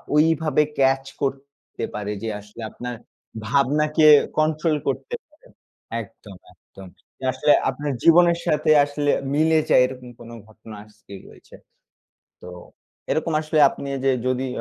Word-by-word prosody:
ওইভাবে 155 -1 +2 0.2
ক্যাচ 135 0 +2 0.2
করতে 140 -2 -6
পারে 105 0 -4
যে, - - -3
আসলে 105 +3 -13
আপনার 125 +2 -7 0.5
ভাবনাকে 150 +4 +1 0.3
কন্ট্রোল 155 +1 +1
করতে 140 - -3
পারে 305 +9 -28 0.6
একদম, 100 -1 -14 0.2
একদম। 95 -1 -16 0.3
যে - - -14
আসলে 145 +4 +2 0.2
আপনার 145 +2 -4
জীবনের 170 0 +5
সাথে 150 +1 0 0.2
আসলে 145 0 -1 0.2
মিলে 160 +1 +3
যায়, - - +5
এরকম 125 -1 -8
কোন 115 - -12 0.2
ঘটনা 110 0 -13
আজকে 105 -1 -17 0.2
রয়েছে। - - -17 0.9
তো 90 - -10 0.6
এরকম 160 +1 -1
আসলে 155 0 -2
আপনি 140 - -8 0.2
যে 135 - +3
যদি 130 +1 -1
140 Hz, 130 wpm, -22 LUFS, 125-155 Hz, 0.9 s, জীবনের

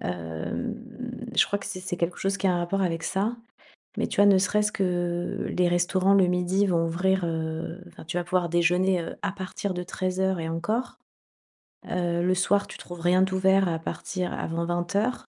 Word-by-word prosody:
Hem, 85 - -4 0.6
je - - +5
crois 200 - -1
que - - -7
c'est 190 -2 -5
c'est 180 -1 -4
quelque 170 +1 -1
chose 195 +1 0
qui 195 - -1
a - - +3
un - - +1
rapport 190 +3 0
avec 165 -2 -1
ça 210 +5 -1 0.6
mais - - 0
tu - - -6
vois 205 - +7
ne 195 -1 +7
serait-ce 210 +2 +2
que 175 -2 -1
les 180 -1 +3
restaurants 185 +2 +3
le 190 -2 +5
midi 180 +3 +2
vont 165 -2 +2
ouvrir 185 +2 +1
heu, 160 +2 -3
enfin, 170 -2 -13
tu 165 - -5
vas 175 - 0
pouvoir 175 0 +1
déjeuner, 180 +2 +3
heu, - - -6
à 200 - 0
partir 190 0 -4
de 180 - -3
13:00 185 0 -1
et 160 - -3
encore. 215 +10 -2 0.9
Heu, 175 -1 0
le 185 +1 +3
soir 200 +2 +2
tu - - -9
trouves 175 -1 -9
rien 180 +2 +4
d'ouvert 190 0 +3
à 165 - 0
partir 180 +2 -4
avant 170 +1 -2
20:00 175 +5 0
heures. 250 - -4
180 Hz, 200 wpm, -26 LUFS, 175-190 Hz, 0.9 s, vois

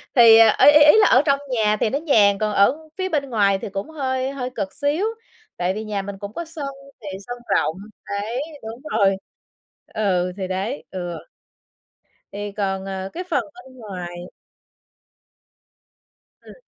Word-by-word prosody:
thì, 230 -3 +8
à, 225 -1 +6
ý 290 - +10
ý 300 0 +7
ý 300 +8 +7
là 425 - +6
ở 255 - +5
trong 280 -2 +3
nhà 215 -4 +1
thì 220 - +1
nó 280 - -1
nhàn 215 -11 +4
còn 215 +1 -1
ở 295 +11 +2
phía 375 0 -2
bên 280 -4 -1
ngoài 200 -4 +2
thì - - -6
cũng 195 +8 -5
hơi 265 -3 -2
hơi 255 -2 -4
cực 195 -3 -3
xíu, 290 +7 0 0.5
tại 180 +1 0
vì 215 - -5
nhà 210 -2 -2
mình 195 0 -7
cũng 200 +1 -7
có 340 - -5
sân 315 -3 -6 0.3
thì 195 -2 -6
sân 245 0 -5 0.2
rộng. 160 - 0 0.3
Đấy, 215 +6 -3 0.2
đúng 225 +3 -8 0.2
rồi 195 -2 +3 0.8
Ừ, 185 -4 0
thì 190 -2 -3
đấy. 195 +9 -3
Ừ. 175 -2 -5 1.1
Thì 205 +1 -5
còn, 195 -2 -2
ờ, 190 0 -5
cái 360 - -4
phần 280 -7 +1
bên 265 -8 -15
ngoài 185 -6 -7 2.3
Ừm. - - -14
215 Hz, 175 wpm, -22 LUFS, 195-275 Hz, 2.3 s, ý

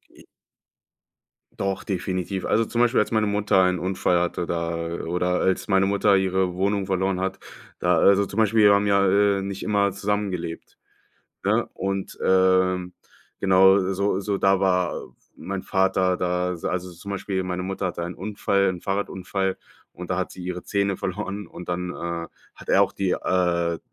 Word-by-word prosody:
I - - -17 1.3
Doch, 95 -1 -2
definitiv. 95 0 -3
Also 115 +1 +2
zum 120 +2 -1
Beispiel, 120 +1 +3
als 105 - 0
meine 110 -1 +2
Mutter 105 -2 +2
einen 90 -1 +1
Unfall 90 -1 +1
hatte 90 0 -1
da 85 0 -2 0.3
oder 90 +1 0
als 95 +2 0
meine 95 -1 +3
Mutter 100 0 +3
ihre 95 -1 0
Wohnung 100 +1 0
verloren 95 0 0
hat, 95 +1 -3 0.4
da 90 -1 +2
also 100 +3 +5
zum 100 - -9
Beispiel, 110 0 +3
wir 100 0 +7
haben 100 +1 +1
ja, 100 -1 +3
äh, 100 0 +3
nicht 100 0 -5
immer 100 -1 +1
zusammengelebt, 100 -4 -3 0.7
ne? - - +1
Und, 95 0 -4
ähm, 95 -1 +2 0.5
genau, 95 +1 +5
so 100 0 0
so 100 0 -2
da 95 0 +3
war 90 -2 +1 0.4
mein 95 -1 -5
Vater 95 -1 +1
da. 90 0 -1
Al 85 - -8
also 90 0 -3
zum 100 +4 -9
Beispiel 95 -1 -2
meine 90 0 -3
Mutter 95 0 -2
hatte 85 -1 -4
einen 85 0 -5
Unfall 100 0 0
'n 90 -1 -4
Fahrradunfall 95 -1 -2 0.4
und 90 0 -9
da 90 - 0
hat 95 - -2
sie 90 - -9
ihre 90 0 -5
Zähne 100 -1 0
verloren 100 +2 -4
und 90 0 -10
dann, 90 0 -2
äh, 85 -1 -4 0.3
hat - - -13
er - - +5
auch - - -3
die, 95 -2 -1
äh, 85 -2 0
95 Hz, 175 wpm, -24 LUFS, 90-100 Hz, 1.3 s, wir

